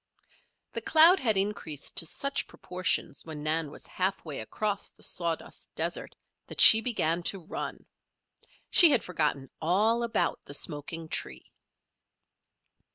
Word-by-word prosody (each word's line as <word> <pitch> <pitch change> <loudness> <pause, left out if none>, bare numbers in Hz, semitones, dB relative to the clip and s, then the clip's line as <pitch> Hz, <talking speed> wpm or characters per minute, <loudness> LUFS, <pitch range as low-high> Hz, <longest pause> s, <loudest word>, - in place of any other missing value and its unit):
The - - -3
cloud 330 +4 +5
had 220 -6 +1
increased 190 -7 -2
to 165 - +2
such 275 - -3
proportions 180 0 -3
when 155 -2 -8
Nan 155 0 -1
was 150 - -12
half 190 0 -3
way 150 -4 -6
across 200 - -3
the - - -16
sawdust 170 -2 -5
desert - - -4 0.3
that - - -8
she 220 - +10
began 175 -9 -1
to 180 0 -2
run. - - -7 0.9
She 345 - +9
had 260 -7 +2
forgotten 150 -6 -2
all 210 +8 +1
about 235 -1 -1
the 145 - -5
smoking 155 +3 -6
tree. - - -5
180 Hz, 135 wpm, -28 LUFS, 155-220 Hz, 0.9 s, she